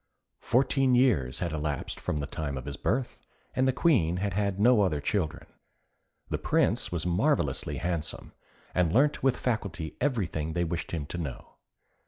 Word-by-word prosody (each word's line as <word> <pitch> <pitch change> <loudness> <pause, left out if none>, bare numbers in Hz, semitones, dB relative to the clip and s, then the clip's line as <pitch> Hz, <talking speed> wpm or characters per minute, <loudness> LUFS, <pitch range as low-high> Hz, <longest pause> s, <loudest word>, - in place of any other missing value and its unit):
Fourteen 130 +1 +2
years 75 - +2
had 85 -2 -1
elapsed 75 -2 -3
from - - -2
the 70 - -2
time 70 -3 -4
of 65 - -6
his 70 - -4
birth, 125 - -1 0.4
and 130 +1 +3
the - - +4
Queen 105 - +2
had 100 0 -1
had 100 -1 0
no 120 0 +5
other 85 -7 +1
children. 80 -1 -1 0.8
The - - -1
Prince - - +1
was 85 -2 -1
marvellously 90 - +1
handsome, 85 -3 -3 0.4
and 90 -3 +2
learnt 145 - +3
with 130 -1 +2
facility 100 -9 -3
everything 90 - -1
they 85 +1 +1
wished 85 0 -3
him 80 -4 -3
to 85 +4 -6
know. 75 -7 -7
90 Hz, 165 wpm, -28 LUFS, 80-120 Hz, 0.8 s, no